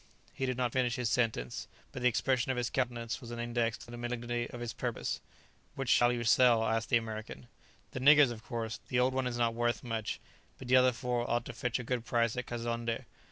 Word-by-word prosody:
He 130 - -2
did 130 -1 -1
not 125 -2 0
finish 125 -2 +1
his 125 -3 -1
sentence, 110 - -1 0.2
but 130 - -6
the 125 - +4
expression 130 +2 +1
of 130 - -2
his 120 0 -1
countenance 120 -1 -2
was 120 - -9
an 120 - -5
index 120 -1 -1
to 120 - -12
the 120 - -7
malignity 120 0 -3
of 120 - -8
his 120 -2 -4
purpose. - - -3 0.5
"Which 135 -2 -3
shall 120 -1 +5
you 120 -1 -2
sell?" 120 -1 +5
asked 115 0 0
the 120 - +5
American. 110 - -6 0.5
"The - - -4
niggers, 145 0 +7
of 110 -2 -8
course. 115 -2 -4
The 125 - +1
old 130 +1 +3
one 130 -1 0
is 120 -1 -3
not 115 -1 +2
worth 120 0 0
much, 115 -3 -3 0.4
but 130 - -9
the 130 - +6
other 130 0 +6
four 120 0 -2
ought 120 0 0
to - - -6
fetch 125 -1 -1
a 125 - -5
good 120 0 -2
price 115 -1 +1
at 125 0 -4
Kazonndé." 115 -1 -3
120 Hz, 230 wpm, -32 LUFS, 115-125 Hz, 0.5 s, niggers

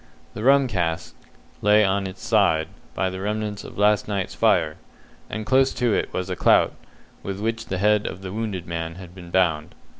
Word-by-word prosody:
The 105 - -6
rum 135 +1 +5
cask 85 -7 -2 0.5
lay 105 +1 +5
upon 95 0 +1
its 95 0 -10
side 80 0 +2 0.3
by 95 -1 0
the 95 0 -6
remnants 105 0 -3
of - - -11
last 105 0 +3
night's 100 -3 -2
fire, 85 -8 +2 0.5
and 110 0 -4
close 130 +4 +3
to 120 -3 +1
it - - -1
was 90 0 -3
a 90 - -3
clout, - - +4 0.5
with 100 0 -5
which 115 +2 -2
the 95 - -2
head 105 +2 +2
of 95 - -7
the 95 - -5
wounded 105 -5 -3
man 85 -1 -4
had 90 -1 -11
been 90 -2 -11
bound. 85 -4 +1
100 Hz, 190 wpm, -23 LUFS, 90-105 Hz, 0.5 s, rum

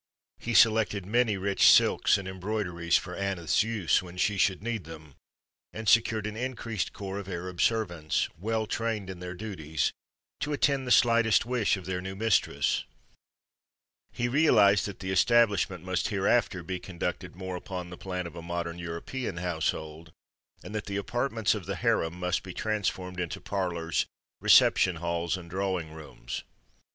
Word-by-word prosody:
He 120 -1 -3
selected 110 -4 +4
many 110 0 +2
rich 100 +1 +4
silks - - +4
and 100 -1 -6
embroideries 95 -3 -1
for 90 +1 -6
Aneth's 95 -4 0
use 105 -5 +1
when 90 -1 -11
she 105 +3 +1
should 95 0 +1
need 115 -4 -3
them, 80 -3 -11 0.6
and 110 0 -6
secured 110 -2 +4
an 105 0 -4
increased 115 -4 -3
corps 100 0 -5
of 100 -1 -8
Arab 90 0 -4
servants, 85 -9 +1
well 110 +6 -1
trained 110 -3 -2
in 90 - -9
their 90 0 -6
duties, 85 -7 -2 0.5
to 145 +1 -2
attend 140 -2 +1
the - - -1
slightest 115 -2 +4
wish 120 -5 +1
of 95 - -9
their 90 0 -3
new 95 +1 -6
mistress. 110 0 +1 1.3
He 120 - -1
realized 105 -9 +4
that 100 - -8
the 95 0 -3
establishment 100 -3 +3
must 95 -1 -1
hereafter 100 -2 +1
be 90 +2 -4
conducted 90 0 -5
more 95 0 -5
upon 90 -1 -6
the - - -6
plan 90 -2 -4
of 85 -1 -8
a 85 - -7
modern 85 0 -4
European 85 +6 -5
household, 80 -2 -3 0.5
and - - -9
that 105 -1 -3
the 100 -1 -3
apartments 115 +1 0
of - - -6
the - - -2
harem 80 +1 0
must 90 0 -1
be 90 -1 -9
transformed 95 -4 -2
into 85 -2 -3
parlors, 85 -4 -2 0.3
reception 90 - +5
halls 85 +1 -2
and 85 -2 -10
drawing 95 -4 -2
rooms. 80 -1 -7
95 Hz, 160 wpm, -28 LUFS, 85-110 Hz, 1.3 s, reception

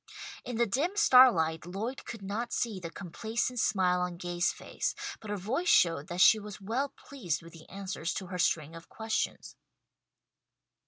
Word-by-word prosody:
In 245 -2 -5
the 235 - +3
dim 285 - 0
starlight 190 - +6
Lloyd 220 +8 -5
could 225 -4 -8
not 220 +5 -3
see 220 -5 -1
the 170 -2 -6
complacent 220 +8 -3
smile 180 -4 +2
on 180 -1 -3
Gay's 175 0 0
face, - - -4 0.2
but 215 - -10
her 205 - -2
voice 255 - -1
showed 165 -3 +4
that 175 +1 -2
she 220 - +7
was 210 -1 -9
well 235 +8 -1
pleased 200 - -5
with 165 - -13
the 165 -1 -14
answers 190 -3 -4
to 190 - -4
her 180 0 -6
string 160 -2 +1
of 165 0 -12
questions. 220 0 -3
195 Hz, 170 wpm, -30 LUFS, 175-235 Hz, 0.2 s, she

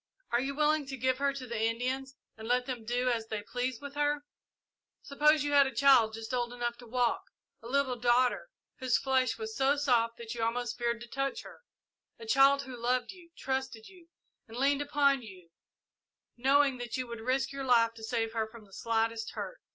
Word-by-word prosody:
Are 240 - +2
you 275 +1 -3
willing 300 -1 +2
to 265 0 -5
give 260 +1 0
her 280 0 +2
to 275 -2 -7
the 235 -3 -4
Indians 255 +4 -1 0.2
and 220 0 -9
let 250 +1 +2
them 250 -4 -5
do 245 +2 0
as 230 -2 -1
they 215 -2 -4
please 250 +2 -3
with 285 -1 -8
her? 290 0 0 0.8
Suppose 300 +1 +3
you 290 - -1
had 280 -1 +6
a 265 - -7
child, 235 -5 +5
just 225 +2 -7
old 240 -1 -1
enough 240 -1 -3
to 245 - -12
walk 245 0 0 0.4
a 230 - -10
little 265 -1 0
daughter, 245 - +2 0.3
whose 255 -3 +2
flesh 260 -3 +1
was 220 0 -6
so 270 +1 +3
soft 235 -5 +2
that 230 -1 -7
you 235 - -5
almost 235 +1 -1
feared 235 -1 -1
to 240 - -8
touch 275 +2 -3
her - - -13 0.6
a 455 - -10
child 280 -8 +5
who 260 -2 -8
loved 245 +4 -1
you, 355 -3 -16
trusted 265 -4 -3
you, 360 -3 -18 0.4
and 225 +1 -10
leaned 280 +2 +2
upon 280 -2 +2
you, 185 -6 -13 0.8
knowing 270 +1 +3
that 240 -1 -4
you 255 - -2
would 235 -2 -8
risk 260 +4 0
your 275 0 -5
life 230 -3 +4
to 225 -1 -13
save 225 0 -2
her 220 -1 -1
from 220 -1 -13
the 195 - -21
slightest 225 0 -1
hurt. - - -6
250 Hz, 205 wpm, -30 LUFS, 230-275 Hz, 0.8 s, had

